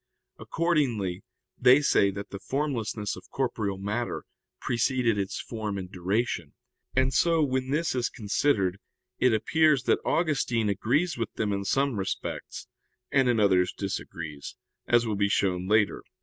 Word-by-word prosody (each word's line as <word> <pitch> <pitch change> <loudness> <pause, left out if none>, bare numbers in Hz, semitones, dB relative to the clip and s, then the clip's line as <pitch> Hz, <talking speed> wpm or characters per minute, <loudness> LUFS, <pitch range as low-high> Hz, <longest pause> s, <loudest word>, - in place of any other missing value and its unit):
Accordingly 120 - 0 0.4
they 125 +2 +7
say 100 -7 +4
that 100 +1 -7
the 100 - -6
formlessness 115 -6 -2
of - - -13
corporeal 110 -7 -2
matter 105 +5 -3 0.4
preceded 120 -2 +1
its 95 -1 -3
form 110 -3 -4
in 95 -2 -6
duration. 100 +6 -2 0.4
And 130 0 +2
so, 165 +3 +3
when 130 -2 -1
this 155 +3 0
is 125 -2 0
considered, 100 -4 0 0.4
it 125 - +4
appears 140 +5 +3
that - - +2
Augustine 125 -9 +1
agrees 140 - 0
with 115 - -2
them 105 -2 -1
in 100 0 -3
some 135 0 +1
respects, 95 - -4 0.4
and 135 -2 +3
in 120 -2 +2
others 95 -3 +3
disagrees, 80 -6 -6 0.3
as 120 0 +4
will 110 -2 -1
be 100 0 +1
shown 95 -2 0
later 105 0 +3
(Q. - - -34
115 Hz, 150 wpm, -27 LUFS, 100-130 Hz, 0.4 s, they